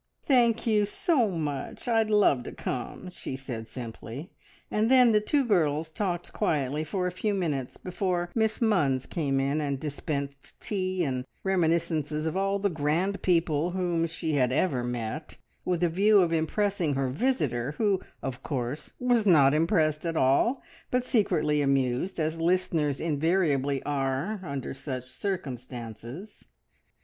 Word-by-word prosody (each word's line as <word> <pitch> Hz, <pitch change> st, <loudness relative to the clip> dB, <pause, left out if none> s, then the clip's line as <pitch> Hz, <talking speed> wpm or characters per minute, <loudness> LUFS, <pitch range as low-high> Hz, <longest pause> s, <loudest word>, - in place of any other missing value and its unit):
"Thank 240 Hz, -4 st, +3 dB
you 210 Hz, -3 st, +3 dB
so 245 Hz, -, +1 dB
much! 150 Hz, -, -4 dB
I'd 225 Hz, -2 st, +2 dB
love 205 Hz, -11 st, +4 dB
to -, -, -5 dB
come," 130 Hz, +8 st, -5 dB
she 135 Hz, -, -6 dB
said 120 Hz, -4 st, -6 dB
simply; 120 Hz, +5 st, -8 dB, 0.4 s
and 215 Hz, +2 st, +2 dB
then 250 Hz, -2 st, +6 dB
the 210 Hz, -1 st, +4 dB
two 275 Hz, +5 st, +1 dB
girls 160 Hz, -7 st, +1 dB
talked 175 Hz, -2 st, -3 dB
quietly 145 Hz, -1 st, 0 dB
together 155 Hz, -, -11 dB
for 185 Hz, -2 st, 0 dB
a 180 Hz, -, 0 dB
few 205 Hz, +3 st, -1 dB
minutes 150 Hz, -9 st, -2 dB
before 180 Hz, -1 st, -2 dB
Miss 220 Hz, -1 st, +1 dB
Munns 150 Hz, -, +2 dB
came 140 Hz, -5 st, 0 dB
in 140 Hz, +3 st, 0 dB
and 140 Hz, -2 st, -2 dB
dispensed 140 Hz, -1 st, -5 dB
tea 185 Hz, -3 st, -1 dB
and 130 Hz, -4 st, -1 dB, 0.2 s
reminiscences 165 Hz, -4 st, +1 dB
of 160 Hz, -, -1 dB
all 195 Hz, +1 st, +1 dB
the 200 Hz, 0 st, +1 dB
grand 165 Hz, +6 st, 0 dB
people 165 Hz, -2 st, +2 dB
whom 170 Hz, -2 st, +1 dB
she 160 Hz, -1 st, -3 dB
had 130 Hz, -3 st, +2 dB
ever 135 Hz, -3 st, +1 dB
met, 120 Hz, +5 st, -4 dB, 0.3 s
with 180 Hz, -1 st, 0 dB
a -, -, +5 dB
view 200 Hz, +5 st, +5 dB
of 170 Hz, -2 st, +1 dB
impressing 165 Hz, -1 st, 0 dB
her 135 Hz, 0 st, 0 dB
visitor, 145 Hz, -, 0 dB
who, 200 Hz, -4 st, +2 dB, 0.2 s
of 130 Hz, -2 st, -4 dB
course, 130 Hz, +1 st, -4 dB
was 245 Hz, -4 st, +2 dB
not 145 Hz, -6 st, +6 dB
impressed 155 Hz, -1 st, +2 dB
at 165 Hz, -1 st, -2 dB
all, 140 Hz, -, +3 dB, 0.3 s
but 250 Hz, 0 st, 0 dB
secretly 150 Hz, -11 st, +2 dB
amused, 135 Hz, +5 st, 0 dB
as 160 Hz, +1 st, -1 dB
listeners 165 Hz, -5 st, +1 dB
invariably 150 Hz, -3 st, +1 dB
are 140 Hz, +8 st, -1 dB
under 140 Hz, -7 st, -4 dB
such 130 Hz, -2 st, -6 dB
circumstances. 130 Hz, -, -6 dB
160 Hz, 150 wpm, -28 LUFS, 140-195 Hz, 0.4 s, then